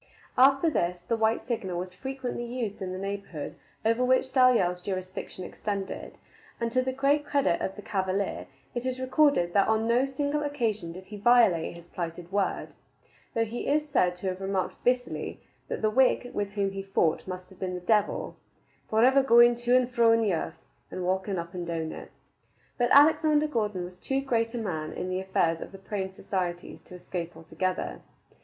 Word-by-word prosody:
After 270 +5 +5
this, 180 - 0
the 230 - +2
white 225 0 +1
signal 190 -7 -3
was 180 +1 -4
frequently 260 +3 -4
used 235 -4 -4
in 185 -1 -3
the 185 - -4
neighborhood 195 -5 -5 0.3
over 230 +3 +3
which 260 +1 +2
Dalyell's 230 -9 +4
jurisdiction 185 0 -5
extended, 200 -2 -5 0.4
and 230 -1 -1
to 255 - +3
the 260 0 -1
great 280 +3 +2
credit 280 -11 +1
of 190 - -2
the 205 - -9
cavalier 195 -2 -2 0.3
it 245 +1 -3
is 255 0 -2
recorded 260 - +3
that 200 -1 +4
on 220 0 +2
no 245 +3 +3
single 285 +2 -1
occasion 230 - -1
did 185 +2 -10
he 210 +2 -9
violate 205 -8 +4
his 170 0 -13
plighted 170 0 -6
word, 200 -1 -1 0.7
though 230 0 +2
he 230 +2 -5
is 300 +1 +1
said 180 -11 +2
to 180 +2 -5
have 185 +1 -5
remarked 195 -1 -2
bitterly 250 0 -1 0.3
that - - -4
the 215 - +3
Whig 250 0 +3
with 205 -1 -2
whom 200 -2 0
he 195 0 -4
fought 195 -5 0
must 185 0 -7
have 190 - -16
been 185 -1 -3
the - - -4
devil, 210 +3 +1 0.5
"forever 255 +5 +5
going 240 -2 +7
to 240 +1 +1
and 255 -1 +4
fro 235 -2 +4
in 230 - +3
the 205 -4 +2
earth, 165 - -4 0.2
and 185 - -5
walking 190 +1 0
up 170 0 -5
and 175 -2 -5
down 165 -1 -2
in 160 0 -4
it." - - -9 0.7
But 240 - +3
Alexander 300 +1 +6
Gordon 210 -9 -1
was 180 +1 -8
too 270 0 -1
great 230 -3 0
a - - -2
man 160 -9 -3
in 185 - -4
the 185 0 -1
affairs 170 -3 0
of - - -7
the 195 - -10
Praying 195 -1 -4
Societies 180 -2 -4
to 180 - -11
escape 175 -2 -6
altogether. 165 - -3
205 Hz, 190 wpm, -28 LUFS, 185-250 Hz, 0.7 s, going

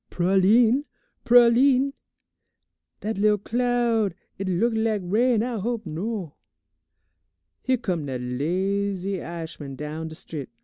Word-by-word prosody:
"Pralines, 215 +9 +3 0.4
pralines! 250 +3 +5 1.1
Dat 215 -1 -3
lil' 210 0 +4
cloud, 235 -3 0 0.2
h'it 195 - -3
look 225 +7 +1
lak' 220 -2 0
rain, 225 +5 +2
I 240 -2 -3
hope 225 +1 -3
no. 180 +1 -4 1.3
"Here 260 0 +1
come 180 - -3
dat 130 -2 -3
lazy 185 +8 -2
I'ishman 160 -4 -7
down 150 +3 -5
de 160 - -9
strit. 155 -5 -7
200 Hz, 115 wpm, -24 LUFS, 170-235 Hz, 1.3 s, pralines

